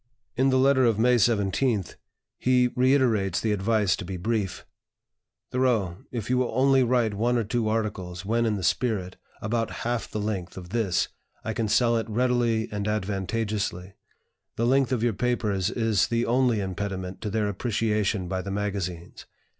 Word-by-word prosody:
In 130 +2 +3
the 130 - +3
letter 130 0 +4
of 115 -4 +3
May 125 +2 +4
17th, 105 -1 +1 0.5
he 125 -1 +3
reiterates 125 -8 +2
the 110 - 0
advice 105 0 +2
to - - -6
be 90 +1 -5
brief: 105 +1 -2 0.9
"Thoreau, 115 -9 +1
if 115 -5 -4
you 125 0 +2
will 130 - 0
only 135 +1 +4
write 120 -3 +2
one 120 +4 +1
or 115 - +1
two 110 0 -1
articles, 100 -5 -3
when 115 +2 +1
in 110 - +1
the 95 - -4
spirit, 95 -2 0 0.3
about 115 +1 -1 0.2
half 120 0 -1
the 110 - -4
length 100 -5 -3
of 90 -1 -8
this, 100 -4 0 0.3
I 110 - -3
can 110 0 -1
sell 115 +2 +3
it 115 0 -3
readily 120 -1 +1
and 105 0 -3
advantageously. 105 -2 -2 0.6
The 115 - 0
length 135 +1 +3
of 120 -3 0
your 120 -2 +2
papers 105 -4 0
is 110 -4 +1
the 115 0 0
only 120 -2 +2
impediment 95 -1 -4
to 105 - -3
their 105 0 0
appreciation 105 -2 -1
by 95 0 -2
the 95 - -6
magazines. 95 -4 -4
110 Hz, 170 wpm, -26 LUFS, 100-120 Hz, 0.9 s, letter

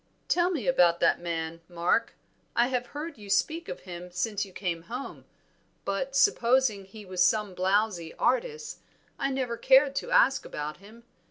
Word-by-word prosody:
"Tell 350 0 +2
me 310 - -2
about 175 -9 +4
that 165 - +3
man, 165 -1 -4
Mark. 175 +6 0 0.4
I 240 +1 +3
have 250 -1 -1
heard 300 -2 -7
you 205 -1 -11
speak 325 +11 0
of 180 - -6
him 180 -1 -8
since 205 +3 -2
you 195 - -10
came 180 -3 -3
home, 250 +3 -6 0.6
but 265 +8 -2
supposing 250 - +3
he 210 +2 -12
was 185 -1 -3
some 210 +1 +2
blowzy 185 -2 0
artist, 460 -2 -1 0.4
I 275 - 0
never 255 -3 -2
cared 270 +2 +5
to - - -3
ask 270 - +4
about 150 +1 -5
him. 215 +5 -16
215 Hz, 165 wpm, -28 LUFS, 180-265 Hz, 0.6 s, cared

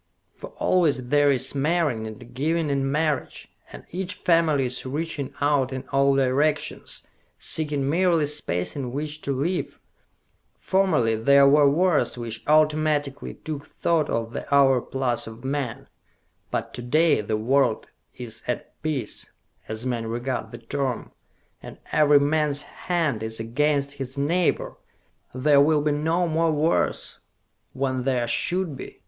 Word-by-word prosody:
For - - -9
always 145 -9 +1
there 145 0 +4
is 130 -3 +1
marrying 145 -6 0
and 120 +2 -11
giving 155 +3 0
in 135 -1 0
marriage, 150 -2 -2 0.2
and - - -11
each 185 +2 -3
family 165 -7 +2
is 125 0 -2
reaching 145 +1 -4
out 145 -3 +2
in 130 0 -4
all 140 0 +3
directions, 140 +3 0 0.3
seeking 145 -3 -1
merely 170 0 +2
space 115 -12 -1
in 130 -4 -4
which 150 +2 -4
to 140 - -3
live. 155 +7 -2 0.8
Formerly 160 -13 +2
there 140 +5 +5
were 145 0 +6
wars 165 -2 +2
which 115 -1 -5
automatically 150 -2 +1
took 150 -2 -7
thought 165 -3 0
of 115 0 -2
the - - -6
overplus 135 -3 +2
of 115 +3 -10
men; 135 -3 -3 0.6
but - - -3
to 125 - -5
day 155 +3 +3
the 105 +1 -2
world 125 +1 +1 0.3
is 110 -3 -7
at 125 - -5
peace, 145 -8 -3 0.4
as 110 +2 -5
men 120 -3 -2
regard 120 0 -3
the 120 - -8
term 130 +2 -3 0.5
and - - -10
every 150 -1 +5
man's 145 0 0
hand 160 -10 -2
is 110 0 -3
against 140 +5 0
his 135 -1 -7
neighbor! 165 +5 0 0.6
There 140 +2 +4
will 150 0 +3
be 150 - +2
no 160 +4 +1
more 165 0 +1
wars, 155 +2 0 0.5
when 130 -1 -1
there 125 -2 0
should 175 +4 0
be! - - -9
140 Hz, 140 wpm, -24 LUFS, 125-155 Hz, 0.8 s, were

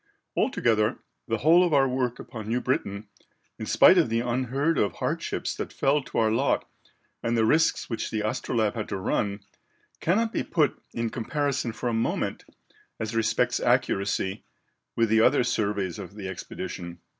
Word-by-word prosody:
Altogether, 110 0 +2 0.3
the 115 -1 0
whole 165 +8 +5
of 170 -4 +2
our 135 -1 +5
work 125 -1 -1
upon 110 -3 -8
New 120 +2 +1
Britain, 105 -5 -2 0.5
in - - -5
spite - - +7
of - - +2
the 115 +1 +1
unheard 130 +6 0
of 100 - +1
hardships - - -2
that - - -5
fell 145 +2 +2
to - - -7
our 110 -1 +3
lot 130 +5 +1 0.5
and 115 0 0
the 110 - +3
risks 160 +7 +2
which 115 - -3
the 110 -1 -1
Astrolabe 110 -2 0
had 110 -3 -4
to 100 - -2
run, 100 +2 -1 0.6
cannot 225 +7 +1
be - - 0
put 155 -4 0
in 115 -1 -2
comparison 140 0 -1
for 120 - -4
a 120 - 0
moment, 115 0 -1 0.5
as 110 +1 -3
respects 110 -1 +1
accuracy, 100 0 0 0.5
with 115 - +3
the 110 0 +4
other 120 - +4
surveys 100 -6 -1
of 95 0 -9
the 100 -3 -6
expedition." 85 -2 -6
115 Hz, 170 wpm, -26 LUFS, 105-130 Hz, 0.6 s, spite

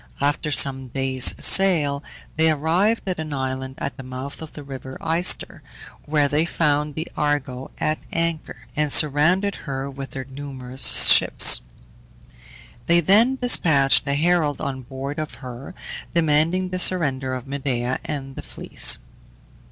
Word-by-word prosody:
After 145 +2 -1
some 135 -2 +2
days' 130 0 0
sail 155 -7 +3 0.3
they 160 +1 +2
arrived 170 +9 0
at 185 -3 -3
an 155 -2 -5
island 130 -1 -4
at 135 -2 -5
the - - -8
mouth 130 +3 -8
of 160 - -10
the 150 - -10
river 135 -1 -9
Ister, 170 +3 0 0.4
where 145 -1 +1
they 150 +2 0
found 150 -3 -1
the 160 +2 -5
Argo 135 -3 -2
at 155 0 -1
anchor, 165 -1 -3
and 150 -1 0
surrounded 165 +8 +3
her 135 -2 -6
with 135 0 -8
their 130 -1 -7
numerous 130 -1 +3
ships. - - +6 1.3
They 170 0 +4
then 215 - +3
despatched 160 - +3
a 140 - 0
herald 155 -2 0
on 135 -3 -5
board 135 +4 -7
of 155 -1 -6
her, 130 +5 -10 0.4
demanding 165 +3 +1
the 185 0 -4
surrender 135 -8 +2
of 125 - -8
Medea 130 -3 -3
and 135 -3 -6
the - - -7
Fleece. - - +1
145 Hz, 145 wpm, -22 LUFS, 135-160 Hz, 1.3 s, ships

